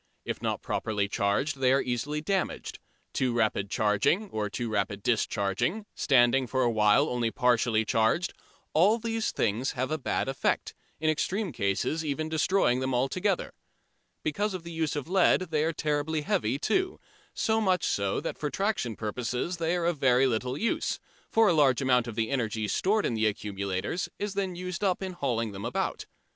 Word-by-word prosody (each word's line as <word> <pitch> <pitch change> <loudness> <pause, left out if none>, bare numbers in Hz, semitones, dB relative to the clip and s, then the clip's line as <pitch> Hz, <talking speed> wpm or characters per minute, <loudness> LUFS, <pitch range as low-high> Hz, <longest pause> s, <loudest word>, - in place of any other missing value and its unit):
If - - -4
not - - -2
properly 105 -2 -1
charged 105 +9 0
they 130 -1 +4
are 135 - +4
easily 135 +5 -2
damaged. 190 +3 -2 0.3
Too 125 -2 +1
rapid 110 -4 +1
charging 110 - +1
or 105 -1 -2
too 120 +4 -3
rapid 100 -2 -2
discharging, 110 - 0
standing 130 0 +3
for 130 +1 +1
a 120 - +2
while 110 +6 +4
only 120 -4 0
partly 120 -3 +2
charged 115 +12 +1 0.4
all 195 +8 +5
these 225 -1 -1
things 115 +5 0
have 130 +1 -2
a 155 - -1
bad 130 - -1
effect, 135 0 -1 0.3
in 155 0 +2
extreme 190 +5 -1
cases 100 +11 -1
even 155 +1 -2
destroying 160 -4 +2
them 130 -1 -1
altogether. 180 +10 0 0.7
Because 195 +6 -1
of 180 - -6
the 170 - -8
use 160 -3 -1
of 145 0 -4
lead 185 +1 +4
they 155 -1 +2
are 160 - +1
terribly 150 0 -1
heavy 120 -3 0
too, 370 - 0 0.4
so 220 0 +1
much 185 -4 +2
so 100 -1 0
that - - -5
for 150 - -1
traction 195 - -1
purposes 125 - -3
they 165 +1 0
are 175 -1 -1
of 170 -4 0
very 130 -1 +4
little 125 +1 -1
use, 230 - -1 0.3
for 225 -1 +4
a 175 - +4
large 140 -6 +4
amount 125 -3 +2
of 115 - -6
the 110 +1 -1
energy 110 -5 -1
stored 205 - +1
in - - 0
the 110 -1 +2
accumulators 100 - -3
is 205 -1 -3
then 195 -2 -2
used 180 +1 -5
up 190 -1 +1
in 190 -1 -4
hauling 120 -9 -1
them 100 0 -7
about. - - -2
135 Hz, 180 wpm, -28 LUFS, 115-175 Hz, 0.7 s, all